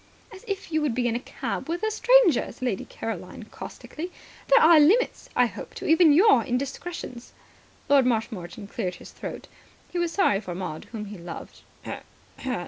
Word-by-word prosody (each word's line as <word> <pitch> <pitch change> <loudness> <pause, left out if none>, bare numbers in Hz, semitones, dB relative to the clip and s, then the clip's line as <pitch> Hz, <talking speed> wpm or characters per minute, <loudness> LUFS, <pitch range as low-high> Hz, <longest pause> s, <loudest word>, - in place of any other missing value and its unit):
"As 385 - -12
if 395 -4 -4
you 315 0 +1
would 285 -6 0
be 245 -1 +1
in 230 - 0
a - - 0
cab 275 - -5
with 345 +4 -2
a 435 - +1
stranger," 470 -4 +4
said - - -11
Lady 235 -7 -1
Caroline 215 -2 -6
caustically. 345 +4 -8 0.4
"There - - +7
are 320 0 +7
limits, 390 +12 +3
I 250 - +5
hope, 235 - -7
to - - -7
even 320 0 +6
your 320 - +6
indiscretions." 270 0 -5 0.5
Lord 275 -3 +5
Marshmoreton 215 -5 -2
cleared 185 -2 -4
his - - -12
throat. - - -7 0.4
He 355 - -2
was 345 -1 0
sorry 335 - +3
for 180 -4 -6
Maud, 175 -4 -5
whom 220 -3 -7
he 205 -2 -9
loved. 170 -1 -9
265 Hz, 175 wpm, -26 LUFS, 220-345 Hz, 0.5 s, There